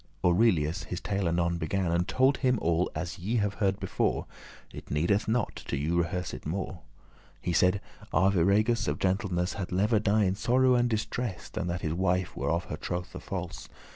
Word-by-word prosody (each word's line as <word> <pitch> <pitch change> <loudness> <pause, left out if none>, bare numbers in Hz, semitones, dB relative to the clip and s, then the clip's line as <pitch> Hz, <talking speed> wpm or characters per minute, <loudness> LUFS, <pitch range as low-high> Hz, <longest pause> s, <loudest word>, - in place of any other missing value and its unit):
Aurelius 90 -3 +3
his 90 - -4
tale 100 -3 -1
anon 85 0 +1
began, 85 +2 0
And 85 +2 +1
told 130 +4 +3
him 125 -3 +2
all 85 +2 +1
as 90 +1 -4
ye 105 +7 -2
have 105 -3 +1
heard 95 -1 +2
before, - - 0 0.5
It - - -10
needeth 85 +8 +1
not 115 0 0
to 70 - -1
you 75 +5 0
rehearse 85 +1 -1
it - - -7
more. 90 +2 -4 0.6
He 90 - -2
said, 90 +4 +3 0.3
"Arviragus 100 +5 +3
of - - 0
gentleness 95 -2 0
Had 95 - -5
lever* 105 +4 +2
die 105 0 +2
in 95 -1 +2
sorrow 125 +5 +3
and 120 0 +3
distress, 110 -2 -3
*rather - - -4
Than - - -2
that 85 0 -2
his 80 - -1
wife 90 0 0
were - - -2
of 85 +2 +1
her 75 - -5
trothe 90 +2 -5
false." - - -6
95 Hz, 190 wpm, -29 LUFS, 85-105 Hz, 0.6 s, Aurelius